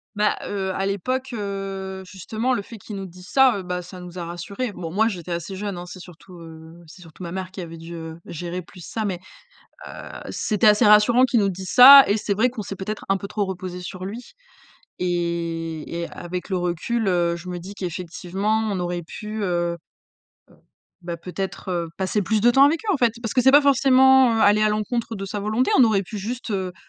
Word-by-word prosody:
Bah, 210 Hz, 0 st, +2 dB
heu, 195 Hz, -2 st, -3 dB
à 195 Hz, -, -2 dB
l'époque, 255 Hz, +7 st, -2 dB
heu, 195 Hz, -3 st, -5 dB
justement 215 Hz, +7 st, -3 dB
le 225 Hz, -, 0 dB
fait 225 Hz, +3 st, -10 dB
qu'ils 210 Hz, 0 st, -9 dB
nous 195 Hz, -1 st, -5 dB
disent 180 Hz, +1 st, -14 dB
ça, 265 Hz, -5 st, +5 dB
heu, 195 Hz, -, -4 dB
bah, 180 Hz, 0 st, -3 dB
ça 180 Hz, +1 st, -11 dB
nous 180 Hz, 0 st, -9 dB
a 170 Hz, -, -4 dB
rassurés. 195 Hz, +8 st, -5 dB
Bon, 170 Hz, -4 st, -6 dB
moi 220 Hz, +4 st, +3 dB
j'étais 180 Hz, -5 st, -6 dB
assez 170 Hz, +3 st, -4 dB
jeune, 200 Hz, -2 st, -4 dB
hein. 175 Hz, -, -7 dB
C'est 185 Hz, +1 st, -10 dB
surtout 180 Hz, +1 st, -14 dB
heu, 165 Hz, +1 st, -13 dB
c'est 170 Hz, +4 st, -15 dB
surtout 165 Hz, +1 st, -13 dB
ma 170 Hz, -1 st, -6 dB
mère 185 Hz, 0 st, -5 dB
qui 185 Hz, -1 st, -7 dB
avait 165 Hz, -1 st, -9 dB
dû 170 Hz, +1 st, -9 dB, 0.3 s
gérer 175 Hz, +2 st, -5 dB
plus 180 Hz, +1 st, -14 dB
ça 220 Hz, -2 st, -3 dB
mais, 180 Hz, -3 st, -3 dB, 0.7 s
heu, -, -, -8 dB, 0.4 s
c'était 210 Hz, -1 st, 0 dB
assez 210 Hz, 0 st, +5 dB
rassurant 210 Hz, +4 st, +6 dB
qu'ils 235 Hz, -3 st, +2 dB
nous 200 Hz, -, +2 dB
disent 185 Hz, 0 st, -6 dB
ça 275 Hz, +2 st, +11 dB
et 200 Hz, +2 st, +2 dB
c'est 205 Hz, -1 st, -1 dB
vrai 225 Hz, +5 st, +2 dB
qu'on 235 Hz, -4 st, -6 dB
s'est, 195 Hz, -, -6 dB
peut-être, 205 Hz, +3 st, -5 dB
un 195 Hz, -, +3 dB
peu 200 Hz, +1 st, -7 dB
trop 210 Hz, 0 st, -1 dB
reposées 180 Hz, -1 st, -6 dB
sur 185 Hz, +1 st, -7 dB
lui. 225 Hz, +6 st, -7 dB, 0.7 s
Et 170 Hz, -2 st, -3 dB
et 170 Hz, -, -3 dB
avec 180 Hz, +2 st, -6 dB
le 190 Hz, -, 0 dB
recul, 180 Hz, +6 st, -1 dB
heu, 175 Hz, -2 st, +1 dB
je 170 Hz, +1 st, -10 dB
me 180 Hz, -1 st, -4 dB
dis 195 Hz, +4 st, -10 dB
qu'effectivement, 185 Hz, +3 st, -2 dB
on 190 Hz, -, -2 dB
aurait 175 Hz, 0 st, -3 dB
pu, 210 Hz, +5 st, -6 dB
heu 175 Hz, -2 st, -1 dB, 0.7 s
heu, -, -, -21 dB, 0.5 s
bah, 170 Hz, -1 st, -5 dB
peut-être, 185 Hz, +2 st, -6 dB
heu, 170 Hz, -2 st, -2 dB
passer 195 Hz, +2 st, 0 dB
plus 215 Hz, +2 st, 0 dB
de 240 Hz, +2 st, +5 dB
temps 270 Hz, +3 st, +6 dB
avec 315 Hz, +3 st, +2 dB
eux 405 Hz, -, +2 dB
en -, -, 0 dB
fait. 240 Hz, -4 st, +2 dB
Parce 225 Hz, -, -3 dB
que 265 Hz, -, +3 dB
c'est 265 Hz, +2 st, +6 dB
pas 290 Hz, +2 st, +8 dB
forcément, 265 Hz, -2 st, +5 dB
heu, 225 Hz, -, +1 dB
aller 205 Hz, +1 st, +5 dB
à -, -, +4 dB
l'encontre 225 Hz, +2 st, -2 dB
de 195 Hz, -, -6 dB
sa 205 Hz, +1 st, -4 dB
volonté, 215 Hz, +5 st, 0 dB
on -, -, +8 dB
aurait 205 Hz, -3 st, +2 dB
pu 210 Hz, +3 st, -7 dB
juste, 230 Hz, +4 st, -5 dB
heu, 190 Hz, -2 st, -2 dB
195 Hz, 225 wpm, -23 LUFS, 175-220 Hz, 0.7 s, ça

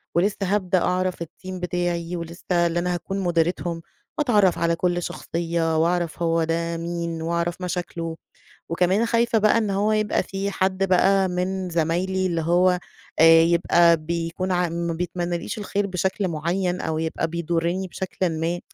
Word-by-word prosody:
ولسّه 195 Hz, +4 st, +2 dB
هابدأ 190 Hz, -2 st, +1 dB
أعرف 185 Hz, -1 st, 0 dB
الteam 185 Hz, +3 st, -10 dB
بتاعي 175 Hz, 0 st, -2 dB
ولسّه 170 Hz, 0 st, -8 dB, 0.2 s
اللي 170 Hz, +1 st, -1 dB
أنا 180 Hz, +1 st, -1 dB
هاكون 185 Hz, +3 st, -4 dB
مُديرتهم 175 Hz, -1 st, 0 dB, 0.4 s
وأتعرّف 210 Hz, -, +3 dB
على 170 Hz, 0 st, +1 dB
كل 175 Hz, 0 st, 0 dB
شخصية 165 Hz, -1 st, -2 dB
وأعرف 170 Hz, 0 st, 0 dB
هو 165 Hz, -1 st, +2 dB
ده 165 Hz, +1 st, -1 dB
مين 170 Hz, -1 st, -4 dB
وأعرف 170 Hz, +2 st, -2 dB
مشاكله. 170 Hz, -2 st, -4 dB, 0.5 s
وكمان 185 Hz, +7 st, +2 dB
خايفة 230 Hz, 0 st, +2 dB
بقى 215 Hz, +2 st, +4 dB
إن 215 Hz, -3 st, 0 dB
هو 205 Hz, +2 st, +1 dB
يبقى 215 Hz, -1 st, +1 dB
في 195 Hz, +1 st, -3 dB
حد 190 Hz, 0 st, 0 dB
بقى 190 Hz, +1 st, +4 dB
من 185 Hz, +1 st, -2 dB
زمايلي 175 Hz, +3 st, 0 dB
اللي 170 Hz, -2 st, 0 dB
هو 180 Hz, +2 st, +3 dB, 0.4 s
آآ 165 Hz, 0 st, +8 dB
يبقى 170 Hz, 0 st, +4 dB
بيكون 170 Hz, +3 st, -3 dB
ع 180 Hz, -1 st, +1 dB
ما 170 Hz, 0 st, -2 dB
بيتمنّاليش 175 Hz, +2 st, -3 dB
الخير 205 Hz, 0 st, -1 dB
بشكل 190 Hz, +1 st, -1 dB
معيّن 175 Hz, +3 st, -1 dB
أو 160 Hz, -1 st, -2 dB
يبقى 160 Hz, +1 st, -2 dB
بيضُرِّني 170 Hz, +2 st, -1 dB
بشكلٍ 185 Hz, 0 st, -2 dB
ما، 170 Hz, +2 st, -1 dB
175 Hz, 150 wpm, -23 LUFS, 170-190 Hz, 0.5 s, آآ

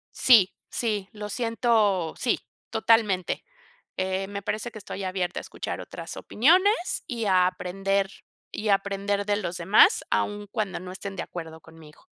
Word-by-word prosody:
Sí, 215 Hz, -7 st, +6 dB, 0.2 s
sí, 210 Hz, -5 st, -1 dB
lo 210 Hz, -1 st, -7 dB
siento 220 Hz, -6 st, +1 dB
sí, 245 Hz, -, +1 dB, 0.3 s
totalmente. 220 Hz, -5 st, +2 dB, 0.5 s
Eh, 190 Hz, +1 st, -1 dB
me 200 Hz, 0 st, -5 dB
parece 215 Hz, +4 st, -3 dB
que 220 Hz, -, -10 dB
estoy 200 Hz, -1 st, -7 dB
abierta 185 Hz, -1 st, -2 dB
a -, -, -9 dB
escuchar -, -, -5 dB
otras -, -, -8 dB
opiniones 365 Hz, -, +3 dB
y 235 Hz, -3 st, -3 dB
a 185 Hz, -2 st, +4 dB
aprender 195 Hz, +1 st, -1 dB, 0.4 s
y 215 Hz, -, -3 dB
aprender 200 Hz, 0 st, 0 dB
de 205 Hz, -1 st, +2 dB
los 180 Hz, -4 st, -3 dB
demás 195 Hz, -, +5 dB
aun 205 Hz, 0 st, -1 dB
cuando 205 Hz, -6 st, -2 dB
no 180 Hz, 0 st, -8 dB
estén 195 Hz, +1 st, -6 dB
de -, -, -2 dB
acuerdo 160 Hz, -2 st, -8 dB
conmigo. 155 Hz, -2 st, -16 dB
200 Hz, 155 wpm, -26 LUFS, 185-220 Hz, 0.5 s, Sí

